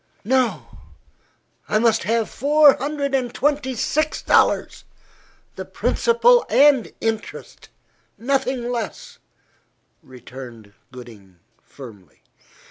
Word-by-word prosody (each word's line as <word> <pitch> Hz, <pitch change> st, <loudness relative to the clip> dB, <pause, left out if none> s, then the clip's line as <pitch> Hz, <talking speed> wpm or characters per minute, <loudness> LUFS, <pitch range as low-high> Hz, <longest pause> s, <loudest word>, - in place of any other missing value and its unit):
"No, 255 Hz, 0 st, -1 dB, 0.9 s
I 215 Hz, -, +1 dB
must 225 Hz, 0 st, +1 dB
have 225 Hz, 0 st, 0 dB
four 290 Hz, +2 st, +4 dB
hundred 285 Hz, 0 st, -4 dB
and 255 Hz, -3 st, -1 dB
twenty 280 Hz, -1 st, -1 dB
six 310 Hz, +6 st, -2 dB
dollars, -, -, +1 dB, 0.7 s
the -, -, -5 dB
principal 475 Hz, +1 st, +2 dB
and 280 Hz, -4 st, +3 dB
interest. 225 Hz, -1 st, -6 dB, 0.5 s
Nothing 260 Hz, -1 st, -2 dB
less," 230 Hz, -4 st, -6 dB, 0.8 s
returned 125 Hz, -4 st, -13 dB, 0.2 s
Gooding 110 Hz, -7 st, -14 dB, 0.2 s
firmly. 105 Hz, -, -15 dB
240 Hz, 90 wpm, -20 LUFS, -, 0.9 s, four